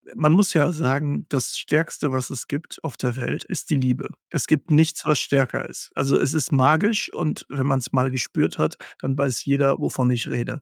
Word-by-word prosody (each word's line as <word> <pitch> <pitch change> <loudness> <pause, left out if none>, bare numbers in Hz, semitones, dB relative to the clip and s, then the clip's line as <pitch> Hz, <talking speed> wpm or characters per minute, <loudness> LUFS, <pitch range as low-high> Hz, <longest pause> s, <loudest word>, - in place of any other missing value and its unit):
man 150 0 +4
muss 195 +3 +5
ja 160 +1 +4
sagen, 145 -1 -1
das 130 -4 -2
Stärkste, 150 -2 0
was 130 -1 -2
es 130 - -6
gibt 145 +3 -6
auf 160 - -5
der 125 -2 -2
Welt, 130 - -3
ist - - -6
die 155 - +2
Liebe. 130 -1 0 0.2
Es 150 -5 -2
gibt 155 +1 +1
nichts, 160 +1 +3
was 150 -2 +3
stärker 135 -4 0
ist. - - -10
Also, 135 +1 +2
es 140 - +1
ist 155 +1 -1
magisch 160 - +3
und 155 - -3
wenn 135 0 -2
man's 130 -3 0
mal 130 0 +2
gespürt 130 -3 -1
hat, - - 0 0.2
dann 135 +1 -2
weiß 135 -4 -1
jeder, 140 -1 +3
wovon 125 -1 0
ich 120 -1 0
rede. 130 +3 -4
140 Hz, 210 wpm, -23 LUFS, 130-155 Hz, 0.2 s, muss